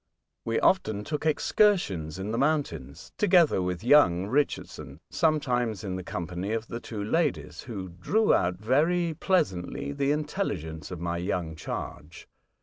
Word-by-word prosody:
We 115 Hz, 0 st, 0 dB
often 110 Hz, -, +2 dB
took 150 Hz, +5 st, -3 dB
excursions 145 Hz, -, +2 dB
in 95 Hz, +3 st, -4 dB
the 115 Hz, -, -1 dB
mountains 140 Hz, -, -1 dB
together 175 Hz, -, +4 dB
with 90 Hz, 0 st, -3 dB
young 95 Hz, -10 st, +5 dB
Richardson, 105 Hz, -, -2 dB
sometimes 125 Hz, -, +1 dB
in 95 Hz, -3 st, -3 dB
the 95 Hz, -, -5 dB
company 90 Hz, +4 st, -4 dB
of 115 Hz, 0 st, -2 dB
the 115 Hz, -, -4 dB
two 110 Hz, -3 st, -6 dB
ladies, 155 Hz, +7 st, -1 dB
who 100 Hz, -7 st, -6 dB
drew 195 Hz, -, +1 dB
out 90 Hz, 0 st, +2 dB
very 160 Hz, -, +1 dB
pleasantly 140 Hz, -, -1 dB
the 140 Hz, 0 st, 0 dB
intelligence 95 Hz, -, -3 dB
of 90 Hz, -, -6 dB
my 85 Hz, 0 st, -2 dB
young 85 Hz, -3 st, -2 dB
charge. 80 Hz, 0 st, -7 dB
110 Hz, 145 wpm, -27 LUFS, 90-150 Hz, -, young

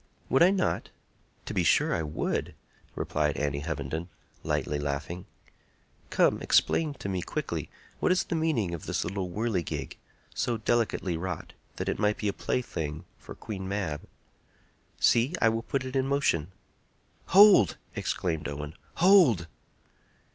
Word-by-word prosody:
"Would 135 Hz, -, +3 dB
I 175 Hz, -, +8 dB
not? 190 Hz, -2 st, 0 dB, 0.6 s
to -, -, -5 dB
be -, -, +1 dB
sure -, -, +3 dB
I 85 Hz, -, 0 dB
would!" 75 Hz, -1 st, -2 dB, 0.4 s
replied 75 Hz, -2 st, -1 dB
Annie 70 Hz, -1 st, -1 dB
Hovenden, 80 Hz, +2 st, -4 dB, 0.3 s
lightly 75 Hz, 0 st, -1 dB
laughing. 75 Hz, +5 st, -4 dB, 0.8 s
"Come; -, -, +3 dB
explain 155 Hz, -3 st, +2 dB
to 100 Hz, -, -6 dB
me 95 Hz, -2 st, -1 dB
quickly -, -, -4 dB, 0.3 s
what -, -, +2 dB
is 185 Hz, -, +3 dB
the -, -, -4 dB
meaning 155 Hz, -, 0 dB
of 85 Hz, -, -6 dB
this -, -, -1 dB
little 95 Hz, +1 st, -3 dB
whirligig, 100 Hz, -2 st, -2 dB, 0.4 s
so 120 Hz, -2 st, -1 dB
delicately 110 Hz, -6 st, 0 dB
wrought 95 Hz, +2 st, -5 dB, 0.2 s
that -, -, -4 dB
it -, -, -1 dB
might 105 Hz, 0 st, +2 dB
be 105 Hz, -, -2 dB
a 100 Hz, -, 0 dB
plaything 80 Hz, -12 st, -3 dB
for -, -, -10 dB
Queen 95 Hz, -4 st, -6 dB
Mab. 95 Hz, -7 st, -2 dB, 1.0 s
See! 125 Hz, +9 st, +3 dB
I 115 Hz, -, +5 dB
will 115 Hz, 0 st, -1 dB
put 130 Hz, +3 st, -2 dB
it 130 Hz, +1 st, -6 dB
in 135 Hz, 0 st, +1 dB
motion." 135 Hz, -, +1 dB, 0.8 s
"Hold!" 195 Hz, -, +7 dB, 0.2 s
exclaimed 80 Hz, -4 st, -2 dB
Owen, 75 Hz, +1 st, -5 dB, 0.2 s
"hold!" 170 Hz, -, +5 dB
100 Hz, 145 wpm, -28 LUFS, 80-130 Hz, 1.0 s, I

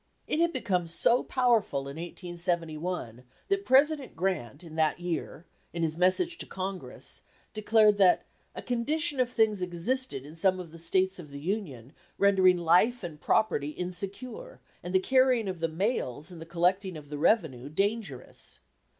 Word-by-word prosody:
It 305 Hz, -, -1 dB
had 340 Hz, 0 st, +3 dB
become 190 Hz, -, -1 dB
so 235 Hz, +9 st, +3 dB
powerful 235 Hz, -, +1 dB
in 140 Hz, +2 st, -8 dB
1871 170 Hz, -, -3 dB, 0.3 s
that 395 Hz, 0 st, 0 dB
President 280 Hz, +1 st, +3 dB
Grant 165 Hz, -5 st, -2 dB
in 165 Hz, -2 st, -11 dB
that 160 Hz, 0 st, +1 dB
year, 175 Hz, -1 st, -4 dB, 0.3 s
in 170 Hz, -1 st, -2 dB
his 160 Hz, -1 st, 0 dB
message 185 Hz, -, +2 dB
to -, -, -5 dB
Congress, 190 Hz, 0 st, -6 dB, 0.3 s
declared 215 Hz, -1 st, +4 dB
that 185 Hz, -2 st, +5 dB, 0.3 s
"a -, -, -6 dB
condition 285 Hz, +5 st, 0 dB
of 250 Hz, -2 st, +2 dB
things 220 Hz, -5 st, +2 dB
existed 180 Hz, -, -1 dB
in 150 Hz, +2 st, -11 dB
some 185 Hz, +2 st, +2 dB
of 175 Hz, -3 st, -8 dB
the 165 Hz, -, -12 dB
States 185 Hz, +3 st, 0 dB
of 155 Hz, -4 st, -10 dB
the 140 Hz, 0 st, -8 dB
Union 145 Hz, -, -4 dB, 0.2 s
rendering 190 Hz, -2 st, +5 dB
life 180 Hz, +8 st, +3 dB
and 155 Hz, -4 st, -7 dB
property 150 Hz, -9 st, +1 dB
insecure, 200 Hz, -, -6 dB, 0.2 s
and 180 Hz, +1 st, -5 dB
the -, -, +6 dB
carrying 255 Hz, 0 st, +3 dB
of 185 Hz, -2 st, -4 dB
the 165 Hz, -, +1 dB
mails 165 Hz, -, -2 dB
and 170 Hz, -2 st, -10 dB
the 165 Hz, -, -9 dB
collecting 180 Hz, +2 st, 0 dB
of 145 Hz, -2 st, -12 dB
the 145 Hz, -1 st, -5 dB
revenue 150 Hz, -, +1 dB
dangerous." 195 Hz, -, -3 dB
185 Hz, 160 wpm, -29 LUFS, 165-225 Hz, 0.3 s, the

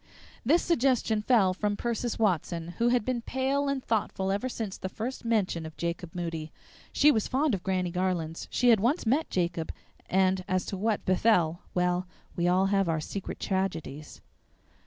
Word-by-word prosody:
This 315 Hz, +9 st, +3 dB
suggestion 250 Hz, -8 st, +2 dB
fell 210 Hz, -5 st, +4 dB
from 205 Hz, +2 st, -1 dB
Persis 235 Hz, 0 st, -2 dB
Watson, 175 Hz, -5 st, 0 dB
who 235 Hz, -, +3 dB
had 240 Hz, -3 st, +2 dB
been 255 Hz, -2 st, -1 dB
pale 270 Hz, +3 st, 0 dB
and 275 Hz, -2 st, -2 dB
thoughtful 195 Hz, -3 st, -1 dB
ever 205 Hz, +6 st, -1 dB
since 220 Hz, -5 st, -4 dB
the 190 Hz, -, -5 dB
first 230 Hz, +7 st, -5 dB
mention 210 Hz, -8 st, 0 dB
of 160 Hz, -1 st, -9 dB
Jacob 170 Hz, 0 st, -4 dB
Moody. 165 Hz, -3 st, -4 dB, 0.4 s
(She 300 Hz, -, +5 dB
was 220 Hz, -6 st, 0 dB
fond 280 Hz, +1 st, +1 dB
of 190 Hz, -, -1 dB
Granny 185 Hz, -1 st, -1 dB
Garlands; 175 Hz, -3 st, -2 dB
she 245 Hz, -, +2 dB
had 225 Hz, -3 st, +6 dB
once 245 Hz, -, +1 dB
met 275 Hz, +8 st, +1 dB
Jacob; 170 Hz, -2 st, -1 dB, 0.4 s
and, 190 Hz, 0 st, +2 dB
as 185 Hz, 0 st, 0 dB
to -, -, -4 dB
what 210 Hz, +2 st, -1 dB
befell, 180 Hz, -4 st, +2 dB
well, 180 Hz, 0 st, +1 dB, 0.3 s
we 175 Hz, 0 st, +1 dB
all 185 Hz, +2 st, +3 dB
have 195 Hz, -3 st, +2 dB
our 160 Hz, -1 st, +1 dB
secret 190 Hz, +5 st, -5 dB
tragedies!) 165 Hz, -6 st, -3 dB
195 Hz, 175 wpm, -28 LUFS, 175-235 Hz, 0.4 s, had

